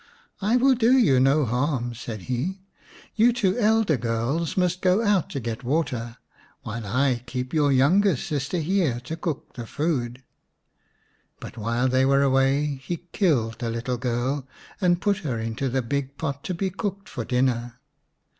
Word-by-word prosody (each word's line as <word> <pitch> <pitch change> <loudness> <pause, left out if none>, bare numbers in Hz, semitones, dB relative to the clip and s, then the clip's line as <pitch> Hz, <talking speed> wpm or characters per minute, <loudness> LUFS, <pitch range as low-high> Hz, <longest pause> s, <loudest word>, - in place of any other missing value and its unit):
" - - -37
I 245 - +5
will 265 +2 +5
do 240 0 +3
you 140 - +4
no 135 +3 +4
harm," 125 0 -1
said 115 -2 -7
he; 170 +10 -3 0.2
" - - -23
you 230 +2 +5
two 210 -6 +1
elder 215 - +3
girls 120 +9 -1
must 180 0 +1
go 185 +4 +3
out 205 -5 +2
to 140 - -4
get 115 +1 -5
water 125 -4 -2 0.5
while 110 0 -5
I 125 +2 +1
keep 125 +1 -4
your 145 -3 +3
youngest 155 +5 +3
sister 145 +4 -2
here 165 -6 +1
to 140 +6 -5
cook 160 -3 -5
the 120 -2 -7
food." 130 -5 -2 1.2
But - - -9
while 115 +3 0
they 130 +1 +3
were 140 +1 +4
away 135 +1 +2
he 170 +4 -5
killed 120 - +1
the 120 - -2
little 115 +2 -2
girl, 125 +3 -2 0.3
and 175 -2 +3
put 200 +3 +1
her 140 - -3
into 115 +4 -2
the 130 +1 0
big 140 +2 -3
pot 140 -3 -4
to 185 - -2
be 190 +2 -2
cooked 200 0 -4
for 120 - -5
dinner. 120 -1 0
135 Hz, 175 wpm, -25 LUFS, 120-175 Hz, 1.2 s, I